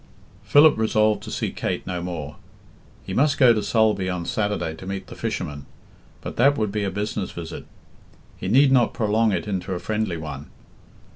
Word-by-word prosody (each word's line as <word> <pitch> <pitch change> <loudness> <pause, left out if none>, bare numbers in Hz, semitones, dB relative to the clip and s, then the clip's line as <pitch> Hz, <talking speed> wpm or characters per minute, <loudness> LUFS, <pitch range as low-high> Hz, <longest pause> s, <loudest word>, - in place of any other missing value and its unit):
Philip 150 -3 +5
resolved 110 -1 +2
to - - -8
see - - -2
Kate - - -3
no 90 -1 -3
more. 80 -5 -6 0.7
He - - -5
must 145 +2 +2
go 125 -4 +6
to 110 - 0
Sulby 105 -4 +1
on 90 -2 -3
Saturday 105 -6 -1
to 95 - -10
meet 95 0 -4
the - - -11
fishermen, 70 -1 -4 0.5
but - - -7
that 140 +4 +4
would 105 -2 -1
be 105 0 -2
a 100 - 0
business 105 0 -3
visit; 85 -1 -8 0.7
he - - -6
need 135 +7 +5
not 125 -3 +3
prolong 110 -1 +2
it 100 - -2
into 95 -1 -3
a - - -4
friendly 105 -3 -2
one. 75 -3 -7
105 Hz, 185 wpm, -23 LUFS, 90-110 Hz, 0.7 s, go